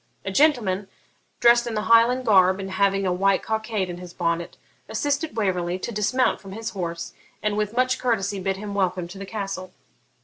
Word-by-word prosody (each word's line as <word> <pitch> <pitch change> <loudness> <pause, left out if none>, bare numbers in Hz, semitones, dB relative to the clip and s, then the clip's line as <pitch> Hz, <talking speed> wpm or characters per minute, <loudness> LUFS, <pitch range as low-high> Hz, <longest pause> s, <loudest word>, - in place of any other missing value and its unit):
A 195 - -2
gentleman, 210 -8 +2 0.5
dressed 240 0 +5
in 230 - -3
the 210 - -1
Highland 235 +3 +4
garb 190 -3 +5
and 195 0 -5
having 195 0 +1
a 180 - +1
white 195 +1 +2
cockade 220 -3 -2
in 175 -1 -6
his 180 -1 -10
bonnet, 170 -1 -2 0.3
assisted 290 -1 -1
Waverley 180 -4 0
to 210 - -5
dismount 235 +5 +1
from 195 -1 -10
his 225 +1 -5
horse, 170 -3 -5 0.3
and 210 -1 0
with 210 +2 -2
much 255 0 +2
courtesy 205 -5 0
bid 190 0 -1
him 205 0 -6
welcome 185 -3 0
to 195 +2 -10
the 195 - -7
castle. 195 -3 -5
200 Hz, 190 wpm, -24 LUFS, 185-230 Hz, 0.5 s, dressed